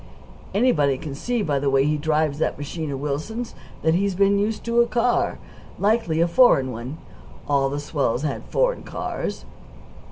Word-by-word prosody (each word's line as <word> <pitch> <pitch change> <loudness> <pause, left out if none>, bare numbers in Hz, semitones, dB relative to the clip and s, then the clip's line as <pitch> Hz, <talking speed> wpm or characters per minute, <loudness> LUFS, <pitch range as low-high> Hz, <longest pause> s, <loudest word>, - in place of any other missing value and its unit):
"Anybody 150 - +3
can 145 +1 -6
see 235 - -2
by 145 -6 0
the 140 0 +1
way 135 0 +3
he 150 +1 +2
drives 150 -1 0
that - - 0
machine 155 +2 -5
of 135 - -4
Wilson's 155 - -4 0.3
that 160 - +3
he's 195 +2 +1
been 200 +1 +3
used 210 +1 -1
to 235 0 +3
a 235 - +2
car 240 0 +1 0.4
likely 210 -6 +1
a 170 - +4
foreign 170 - +4
one. 125 +6 -6 0.5
All 140 -1 +2
the 145 +1 -3
swells 145 -3 -1
have 145 -3 -2
foreign - - +1
cars." - - -5
155 Hz, 170 wpm, -23 LUFS, 140-215 Hz, 0.5 s, a